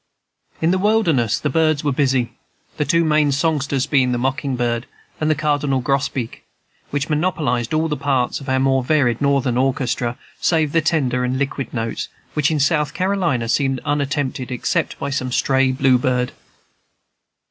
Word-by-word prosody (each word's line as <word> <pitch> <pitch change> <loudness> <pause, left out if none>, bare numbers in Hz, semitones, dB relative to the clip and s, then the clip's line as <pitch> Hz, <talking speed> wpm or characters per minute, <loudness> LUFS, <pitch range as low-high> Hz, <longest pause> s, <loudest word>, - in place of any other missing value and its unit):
In 165 - +4
this 185 0 +1
wilderness 170 - +2
the - - -1
birds 155 -1 +2
were 145 - +1
busy; 130 -3 +1 0.5
the 150 - 0
two 170 +1 +3
main 150 -2 +3
songsters 140 -2 0
being 130 -4 +2
the - - 0
mocking 135 +2 -1
bird 120 0 -1 0.3
and 155 - 0
the 155 - +3
cardinal 145 -2 0
grosbeak, 130 -2 -2 0.5
which 145 -1 -2
monopolized 150 -7 0
all 155 +1 +1
the 150 - -1
parts 135 -5 0
of 135 - -7
our 130 - +2
more 135 -1 +2
varied 125 -4 +1
Northern 140 -3 +1
orchestra 125 -2 0 0.2
save 160 -4 +1
the 165 - +3
tender 135 -6 +1
and 125 +1 -1
liquid 135 -2 -3
notes, 115 -2 -3 0.2
which 150 -1 +2
in 155 -2 0
South 150 0 +1
Carolina 180 -11 0
seemed 135 +2 +1
unattempted 140 -3 -1
except 125 - -1
by 140 - -4
some 130 -1 -2
stray 135 +1 +2
blue 130 -1 +3
bird. 125 0 0
135 Hz, 165 wpm, -20 LUFS, 125-150 Hz, 0.5 s, In